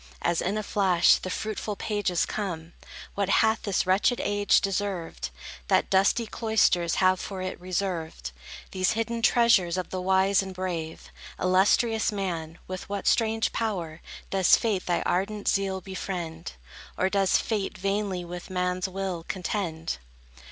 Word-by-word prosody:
As 170 -1 +1
in 195 +4 -1
a 215 - -2
flash 190 -4 +4
the 185 - -6
fruitful 215 +1 -3
pages 205 -5 0
come, 170 -5 -4 0.4
What 200 -1 -1
hath 220 +2 +3
this 200 -3 0
wretched 195 +6 +2
age 205 0 +3
deserved, 195 - -3 0.4
That - - +2
dusty 195 +5 +3
cloisters 215 -7 +2
have 185 -1 +3
for 190 -2 -5
it 185 -1 -5
reserved 175 - -3 0.4
These 185 0 +1
hidden 230 +1 -2
treasures 225 -8 +4
of 185 - -4
the 185 - -3
wise 190 +1 +3
and 190 -1 -7
brave? 170 -4 -5 0.3
Illustrious 210 +5 +3
man, 170 -5 -4
with 185 +1 -6
what 200 -1 -3
strange 225 -1 +2
power 175 -8 -3 0.3
Does 190 -2 +5
Fate 210 -5 -1
thy 175 - +1
ardent 200 +3 -1
zeal 195 -1 +1
befriend? 175 -3 -5 0.4
Or 185 - +2
does 195 -1 +3
Fate 210 -4 -2
vainly 195 -1 -1
with 175 +1 -8
man's 180 0 -1
will 190 -3 -4
contend? 180 -4 -3
190 Hz, 145 wpm, -27 LUFS, 180-205 Hz, 0.4 s, Does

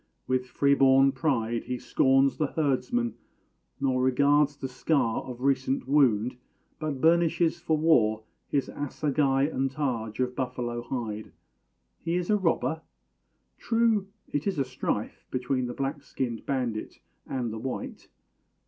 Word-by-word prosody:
With 130 0 0
freeborn 135 0 +4
pride 125 -5 -1
He 125 0 -3
scorns 135 +2 +3
the 155 - +1
herdsman, 125 -6 0 0.7
nor 130 -2 +1
regards 140 +3 +3
the 135 - -4
scar 130 -2 0
Of 125 -1 -8
recent 135 -1 0
wound 125 -5 +3 0.4
but 155 -3 -3
burnishes 170 +1 +3
for 160 -2 0
war 115 -9 +3 0.2
His 140 -2 0
assegai 140 -1 0
and 135 -2 0
targe 125 -6 -3
of 125 0 0
buffalo 125 -2 -3
hide. 115 -4 -5 0.7
He 170 - -2
is 180 +2 0
a - - +5
robber? 165 -3 0 0.8
True; 225 -4 +2 0.3
it 145 +4 -1
is 195 - 0
a 135 - +1
strife 130 -4 -3
Between 130 0 -1
the 120 - -6
black 140 +2 -3
skinned 125 -4 -4
bandit 125 -6 -2 0.3
and 120 -4 -2
the 110 - -5
white. 130 +3 -5
135 Hz, 135 wpm, -27 LUFS, 125-145 Hz, 0.8 s, a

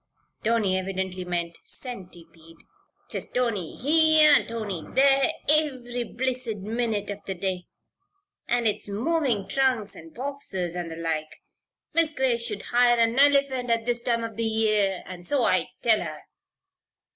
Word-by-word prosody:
Tony 215 -4 +2
evidently 190 -1 -4
meant 170 -1 -3
centipede. 170 -8 -6 0.5
"'Tis - - -3
'Tony, 230 -9 -2
here!' 310 +2 +5
and - - +2
'Tony, 215 -7 -4
there!' 275 +2 +4 0.2
iv'ry 255 -6 +1
blissid 250 -5 -2
minute 220 -2 -2
av 205 0 -8
th' 190 -2 -5
day. 185 -2 -2 0.8
An' 240 0 +1
'tis 210 -2 -1
movin' 240 -1 0
trunks 250 -7 0
an' 165 -2 -12
boxes, 215 - -4
and 175 -2 -4
the 165 - -7
like 160 -2 -4 0.5
Mis' 330 -1 +2
Grace 250 -4 +1
should 210 -4 -3
hire 240 0 +3
a 230 - +5
nelephant 270 0 +3
at 230 -1 +1
this 240 0 0
time 235 -1 0
of 225 -2 -6
the 230 - -1
year, 215 -4 +1
an' 180 -1 -9
so 255 +8 +1
I 185 -5 +2
tell 220 -2 +4
her. 155 -3 -6
225 Hz, 145 wpm, -25 LUFS, 190-255 Hz, 0.8 s, here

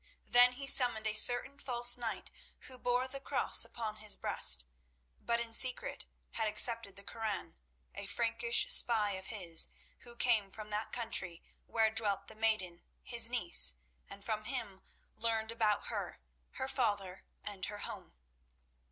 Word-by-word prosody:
Then 245 +1 +4
he 275 +2 -9
summoned 245 -5 +6
a 220 - -2
certain 245 +5 +3
false 245 -3 +3
knight 235 -2 -6 0.3
who 255 -1 -12
bore 245 +1 -2
the 275 +1 -9
Cross - - +4
upon 220 -2 -8
his 215 -1 0
breast, 65 -2 +2 0.5
but 235 0 -3
in 230 -1 -6
secret 250 +2 +3 0.2
had 220 -1 -3
accepted 215 -1 +1
the 200 - -12
Koran, 220 - -7 0.4
a - - -9
Frankish 235 0 0
spy 215 -4 +2
of 190 -1 -8
his, 175 -7 +4 0.3
who 240 -1 -15
came 225 -5 0
from 215 +1 -12
that 210 +1 -5
country 195 -8 -3 0.2
where 220 -1 0
dwelt 205 -3 -3
the - - -14
maiden, 215 -6 -3 0.2
his 235 -1 +4
niece, 205 - +2 0.3
and 200 0 -13
from 215 -1 -5
him 230 -7 -6 0.3
learned 225 0 -4
about 215 -3 -2
her, - - -7 0.3
her 265 - -6
father, 205 -8 -4 0.2
and 195 -2 -6
her 210 - -9
home. - - -11
225 Hz, 150 wpm, -32 LUFS, 205-240 Hz, 0.5 s, summoned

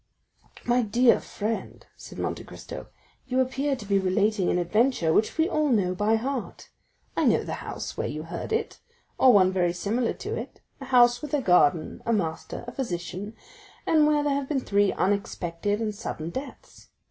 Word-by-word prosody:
"My 245 +1 +3
dear 235 +2 +4
friend," 220 +2 -5
said - - -11
Monte - - -3
Cristo, - - -9 0.4
"you 255 0 0
appear 270 +2 0
to 220 - -9
be 200 -1 +2
relating 195 +1 +1
an - - +1
adventure 180 -1 +2
which 215 - +1
we 320 +1 +3
all 305 -5 +1
know 195 -7 +2
by 210 +4 +2
heart. 240 -4 -4 0.5
I - - +1
know - - +3
the - - -5
house - - -6
where - - -1
you 155 +1 -5
heard 170 - -6
it, 450 0 -2 0.4
or 260 - +7
one 190 -4 +5
very 175 -2 +1
similar 220 +7 -1
to - - -5
it; - - -7 0.2
a 270 - -7
house 245 -2 +5
with 300 -1 -2
a 285 - 0
garden, 175 -4 +3
a 230 - 0
master, 165 +1 -3
a - - -5
physician, 200 -2 -5 0.5
and 310 -2 +4
where 300 -1 +2
there 290 -1 +1
have 275 -1 -2
been 280 -4 0
three 200 -3 +2
unexpected 200 0 -1
and 220 -2 -2
sudden 170 -6 -5
deaths. 270 +5 -9
220 Hz, 180 wpm, -26 LUFS, 185-260 Hz, 0.5 s, or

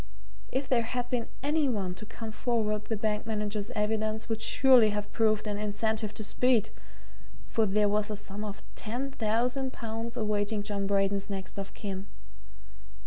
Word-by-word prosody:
If 265 +1 -1
there 250 -2 +4
had 245 +1 -3
been 240 -2 0 0.2
any 295 0 +2
one 195 -6 -1
to 215 +4 -9
come 225 0 -6
forward 215 -2 0
the 220 - -1
bank 210 +1 -1
manager's 210 -1 -1
evidence 215 +1 0
would 225 -1 -1
surely 250 -1 +6
have 205 0 -3
proved 215 -2 +2
an 205 -1 -2
incentive 215 +1 -1
to 215 - -3
speed 235 0 +3 0.8
for 225 -2 +2
there 205 +1 +3
was 210 +1 +2
a 210 - -3
sum 205 0 -6
of 210 -1 -6
ten 245 +5 -3
thousand 250 +3 0
pounds 230 +1 -4
awaiting 210 -1 0
John 200 -2 -1
Braden's 195 0 +1
next 195 0 -4
of 195 0 -6
kin. 195 -1 -5
215 Hz, 165 wpm, -30 LUFS, 205-230 Hz, 0.8 s, surely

